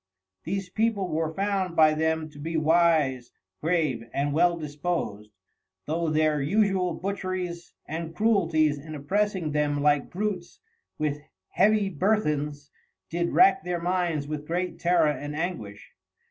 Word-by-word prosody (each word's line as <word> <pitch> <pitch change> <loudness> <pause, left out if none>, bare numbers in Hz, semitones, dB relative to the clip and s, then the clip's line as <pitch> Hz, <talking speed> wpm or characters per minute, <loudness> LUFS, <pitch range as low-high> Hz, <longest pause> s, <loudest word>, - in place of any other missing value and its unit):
These 195 -2 -3
People 215 -4 0
were 160 0 -1
found 195 -1 -1
by 155 -1 +6
them 160 0 0
to 145 - -13
be 160 +2 -3
Wise, 155 -6 +2 0.3
Grave, 155 -8 0
and 140 +1 -1
well 170 +2 +3
dispos'd, 145 - -3 0.6
though 165 +2 -1
their 155 -1 +2
usual 190 +1 +1
Butcheries 185 -2 -4
and 165 +1 -5
Cruelties 165 -9 +2
in 155 +2 -8
opressing 185 +2 -1
them 145 -1 0
like 145 -2 +2
Brutes, 190 -2 -4 0.4
with 150 -1 -2 0.3
heavy 210 +1 +3
Burthens, 150 -6 0 0.4
did 170 +1 0
rack 365 -8 +5
their 175 -1 -2
minds 170 -4 -1
with 150 0 -5
great 175 +1 -2
Terror 175 -1 +3
and 145 0 -5
Anguish. 150 - -5
165 Hz, 130 wpm, -26 LUFS, 150-185 Hz, 0.6 s, by